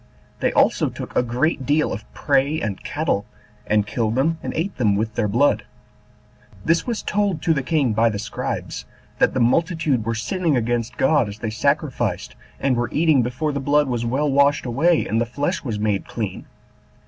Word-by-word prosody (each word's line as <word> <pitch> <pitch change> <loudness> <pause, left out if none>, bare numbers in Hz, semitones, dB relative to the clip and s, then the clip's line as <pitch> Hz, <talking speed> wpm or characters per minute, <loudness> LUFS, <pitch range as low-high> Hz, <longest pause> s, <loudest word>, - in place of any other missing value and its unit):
They - - +1
also - - +3
took - - -8
a - - +4
great 125 +5 0
deal 150 +3 +1
of 105 - -8
prey 140 +2 +1
and 105 -9 -4
cattle, 145 -9 -1 0.4
and 105 -1 +2
killed 110 +1 -1
them, 160 +5 +1
and - - -4
ate 180 +5 -2
them 105 -5 +2
with 110 +2 -1
their 110 -2 0
blood. 140 +8 +2 1.0
This 165 +7 +2
was 235 -3 -2
told 200 -6 0
to 165 - +3
the 140 - 0
king 135 -4 +1
by 115 +2 +3
the 105 - -3
scribes, 105 - -4 0.3
that - - +3
the - - +1
multitude 155 0 +2
were 115 +1 -2
sinning 155 - 0
against 120 -1 -1
God 135 -5 +3
as 100 - -8
they 110 0 -4
sacrificed, 130 - -1 0.2
and 135 -2 +1
were 120 0 -1
eating 155 -4 +3
before 125 +6 -2
the 140 - -2
blood 145 +1 +2
was 120 -2 -1
well 135 +5 0
washed 140 +1 +3
away, 155 +8 +2
and 110 +3 0
the - - +4
flesh 145 +9 -2
was 115 -7 -3
made 105 -2 -1
clean. 105 -5 -5
130 Hz, 190 wpm, -22 LUFS, 115-150 Hz, 1.0 s, a